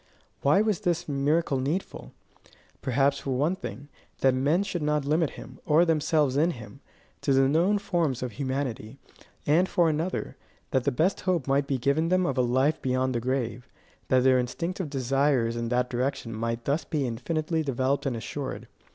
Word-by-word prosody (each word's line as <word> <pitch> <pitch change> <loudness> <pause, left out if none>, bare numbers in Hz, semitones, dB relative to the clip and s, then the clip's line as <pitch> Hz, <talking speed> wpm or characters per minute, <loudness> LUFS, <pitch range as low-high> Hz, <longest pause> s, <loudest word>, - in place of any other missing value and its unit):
Why 145 +8 +4
was 215 -3 +1
this 175 -4 -1
miracle 145 0 +1
needful? 150 +9 -3 0.7
Perhaps, 140 +1 +1
for 130 -2 -2
one 155 +7 +1
thing, 135 - -8 0.3
that 130 -1 +4
men 145 +9 +2
should 175 -4 -3
not 150 -1 0
limit 155 +1 +2
him, - - -11
or 160 +3 +4
themselves 155 -4 +2
in 160 +4 +3
him, 120 +4 -11 0.4
to 140 - +1
the 135 0 +4
known 170 +8 +3
forms 170 - -1
of 125 - -3
humanity; 130 -1 -4 0.5
and 170 +6 +3
for 170 -2 +3
another, 160 +4 -2 0.3
that 130 -2 +1
the 140 - +2
best 165 +9 +1
hope 180 -7 0
might 140 +1 +1
be 135 - 0
given 140 +6 +1
them 185 0 +2
of - - -1
a - - +5
life 130 +5 +1
beyond 130 0 0
the 120 - 0
grave; 125 -1 -2 0.4
that 130 -1 +3
their 130 -1 +5
instinctive 170 +7 -3
desires 135 -3 +1
in 115 0 -3
that 125 0 0
direction 125 -1 -2
might 115 +1 -3
thus 145 +3 0
be 150 -5 -2
infinitely 155 +7 -2
developed 135 0 0
and 125 -3 -1
assured. 135 +4 -5
140 Hz, 175 wpm, -27 LUFS, 130-160 Hz, 0.7 s, a